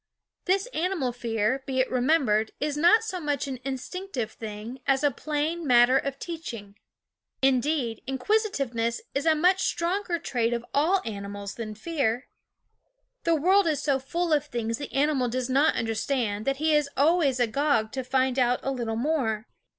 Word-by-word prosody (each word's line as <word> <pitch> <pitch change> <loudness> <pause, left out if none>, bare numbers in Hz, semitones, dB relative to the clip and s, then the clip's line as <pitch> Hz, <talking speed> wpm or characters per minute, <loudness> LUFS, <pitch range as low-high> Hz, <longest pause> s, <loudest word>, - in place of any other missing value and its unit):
This 380 +3 +2
animal 330 -7 0
fear, 235 +1 -1
be 260 -1 -1
it 260 - +1
remembered, 250 -5 +2
is 295 0 -1
not 350 +9 +5
so 380 -5 -4
much 290 -4 -2
an 260 -2 -5
instinctive 270 - -4
thing 220 +3 -7
as 270 +1 +2
a 290 - +4
plain 305 +4 -2
mat 240 -1 +6
ter 260 - +4
of 275 -1 -4
teaching. 240 - -7 0.7
Indeed, 265 -2 +1
inquisitiveness 265 - 0
is 285 +4 -1
a 320 - +5
much 365 +4 +3
stronger 350 +1 0
trait 240 -6 -1
of 235 0 -3
all 345 +7 +2
animals 200 -2 -6
than 215 -2 -6
fear. 255 -2 -1 1.0
The 335 -1 +4
world 370 +5 +4
is 305 -4 0
so 275 -3 +2
full 335 +5 -1
of 300 0 +1
things 230 -4 -3
the 285 - -6
animal 275 -2 +1
does 255 +1 -2
not 280 +4 +3
understand 225 -1 -1
that 275 0 0
he 310 +2 +2
is 295 -1 +2
always 290 -2 +3
agog 245 -1 +1
to 260 0 -3
find 260 0 +1
out 245 0 +2
a 270 - -1
little 235 -4 -2
more. 230 -5 0
270 Hz, 165 wpm, -26 LUFS, 235-315 Hz, 1.0 s, mat